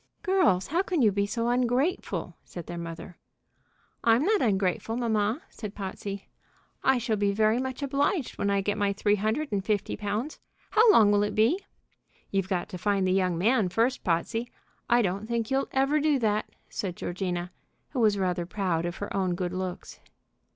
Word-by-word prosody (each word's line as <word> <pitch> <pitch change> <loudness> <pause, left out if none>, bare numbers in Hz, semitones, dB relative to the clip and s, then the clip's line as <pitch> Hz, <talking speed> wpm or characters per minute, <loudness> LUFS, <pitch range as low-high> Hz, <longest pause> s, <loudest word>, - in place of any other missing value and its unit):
"Girls, 370 - +3
how 335 +5 +1
can 355 -7 0
you 215 - +5
be 200 +1 0
so 230 +2 -1
ungrateful?" 250 +8 0
said 175 -3 -9
their 175 - -6
mother. 170 +2 -8 0.8
"I'm 235 +5 +4
not 420 0 +3
ungrateful, 200 +1 0
mamma," 225 +2 0
said 210 -2 -7
Potsey. 195 0 -6 0.6
"I 265 -1 +4
shall 230 -2 -1
be 200 0 +2
very 215 +3 +2
much 260 +2 -4
obliged 280 - 0
when 200 - +1
I 200 0 +2
get 205 +2 -1
my 200 -1 +2
three 205 +1 +2
hundred 220 +9 -1
and 200 -2 0
fifty 210 -1 -1
pounds. 210 +7 -3 0.3
How 445 0 +6
long 215 - +6
will 205 0 +4
it 205 0 -1
be?" 225 - +3 0.7
"You've 195 -1 0
got 180 -3 -1
to 180 - -7
find 200 -1 +1
the 185 - +2
young 185 -2 +1
man 215 +1 +2
first, 230 +7 +1
Potsey. 225 +8 -1 0.4
I 240 0 +5
don't 195 +2 -2
think 230 -1 -2
you'll 270 +1 +1
ever 275 +3 +2
do 300 -1 +3
that," 215 -3 0 0.2
said 185 -4 -4
Georgina, 175 -1 -3 0.4
who 265 - -2
was 215 -3 +4
rather 180 -2 -1
proud 175 -4 -1
of 175 - -4
her 205 - -5
own 185 -2 +1
good 180 0 -3
looks. 185 -1 -5
210 Hz, 185 wpm, -27 LUFS, 190-245 Hz, 0.8 s, How